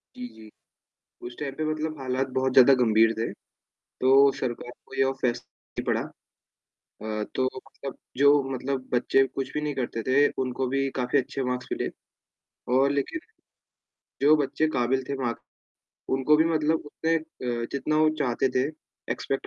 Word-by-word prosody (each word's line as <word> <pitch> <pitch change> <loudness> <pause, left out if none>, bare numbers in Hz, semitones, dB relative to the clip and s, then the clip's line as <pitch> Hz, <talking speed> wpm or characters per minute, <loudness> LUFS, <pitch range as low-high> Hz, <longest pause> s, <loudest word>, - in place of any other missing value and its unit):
जी, 250 0 -6
जी, 110 - -14 0.8
उस 120 - -10
टाइम 140 -2 -4
पे 155 - -2
मतलब 155 -1 -3
हालात 130 0 -1
बहुत 130 0 +1
ज़्यादा 135 +1 +8
गंभीर 110 0 +4
थे, 115 - -2 0.5
तो 135 +2 +4
सरकार 120 -1 -4
को - - -11
यह 135 0 +3
फ़ैस 120 -2 -1 0.4
पड़ा - - +1 0.8
अ, 110 -1 -6
तो 130 - +1
मतलब 135 +1 -9 0.2
जो 145 0 +5
मतलब 130 0 -3
बच्चे 135 +2 +3
कुछ 135 -1 -5
भी 150 - -1
नहीं 150 -1 -2
करते 120 -3 -3
थे, 140 +3 +4
उनको 130 0 -2
भी 135 +1 0
काफ़ी 125 +2 +1
अच्छे 135 +1 -3
मार्क्स 125 0 -3
मिले - - -1 0.9
और 135 +1 +4
लेकिन 140 - -2 1.0
जो 150 +2 +6
बच्चे 150 +2 0
काबिल 130 +2 +1
थे 140 - -1
मार्क्स 120 -3 -3 0.8
उनको 135 +3 +4
भी 160 - +4
मतलब 155 0 +1
उतने 165 +2 0
अ, 125 -7 -4
जितना 150 +2 0
वो 155 - +5
चाहते 125 +1 +1
थे, 130 +3 +1 0.5
एक्स्पेक्ट - - -3
135 Hz, 155 wpm, -26 LUFS, 125-145 Hz, 1.0 s, ज़्यादा